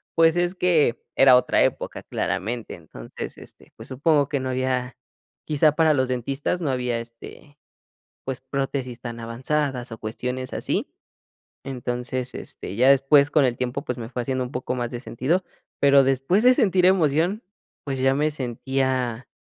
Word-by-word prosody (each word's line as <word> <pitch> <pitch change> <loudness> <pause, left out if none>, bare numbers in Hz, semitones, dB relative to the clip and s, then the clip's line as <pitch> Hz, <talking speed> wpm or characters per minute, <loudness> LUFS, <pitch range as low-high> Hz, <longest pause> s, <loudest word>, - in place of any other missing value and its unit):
pues, 165 0 +5
es 175 +1 0
que 165 -9 +2
era 135 -1 +7
otra 125 - +3
época - - -2
claramente. 115 +4 -3
Entonces, 75 -8 -9
este, - - -15
pues, 115 +4 -12
supongo 145 +1 +2
que 140 - -1
no 130 0 -3
había 130 0 -1 0.5
quizá 150 0 +3
para 160 0 +4
los 130 -2 +1
dentistas, 135 +7 -2
no 150 - -1
había, 125 -2 -1
este, 120 +5 -12 0.7
pues 135 -1 -4
prótesis 130 -2 -3
tan 120 -1 -6
avanzadas 125 +2 -2
o 115 - -6
cuestiones 125 +3 -4
así, - - -2 0.8
entonces, 125 0 -4
este, - - -7
ya 125 +5 +4
después 140 +1 +4
con 150 -3 +4
el 120 -2 +1
tiempo 130 +3 -3
pues 125 - -4
me 115 -2 -6
fue 125 -1 -3
haciendo 130 +1 -1
un 125 - -7
poco 125 -2 -3
más 120 -1 -3
de 120 - -5
sentido, 135 +9 -1 0.4
pero 140 -1 +6
después 135 - +1
de 255 - +7
sentir 190 -6 +3
emoción, 180 - +2 0.4
pues 135 -2 -4
ya 135 0 +3
me 150 +3 +1
sentía 130 -2 -2
130 Hz, 165 wpm, -24 LUFS, 125-145 Hz, 0.8 s, era